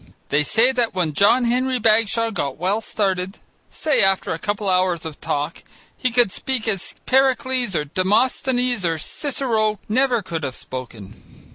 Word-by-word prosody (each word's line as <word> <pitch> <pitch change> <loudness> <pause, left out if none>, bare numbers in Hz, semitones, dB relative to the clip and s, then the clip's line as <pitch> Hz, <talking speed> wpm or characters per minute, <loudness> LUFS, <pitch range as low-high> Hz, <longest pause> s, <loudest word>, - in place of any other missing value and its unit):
They 145 - +2
say 225 - +3
that 240 -5 0
when 170 -5 0
John 225 - +4
Henry 255 +2 +1
Bagshaw 225 0 +2
got 140 -10 -3
well 190 +6 0
started, 190 -3 -2 0.3
say 305 -2 +1
after 195 -3 +1
a 165 - -5
couple 205 +1 -3
of 190 - +2
hours 180 -3 +1
of 155 -2 -8
talk, 145 +4 -3 0.3
he 255 - -1
could 240 -4 +3
speak 250 +2 -2
as 195 -4 -3
Pericles 260 -4 +1
or 150 - 0
Demosthenes 240 - +1
or 165 -2 0
Cicero 220 - -1
never 245 0 +1
could 165 -3 -5
have 130 -2 -4
spoken. 120 -6 -10
210 Hz, 160 wpm, -21 LUFS, 180-245 Hz, 0.3 s, John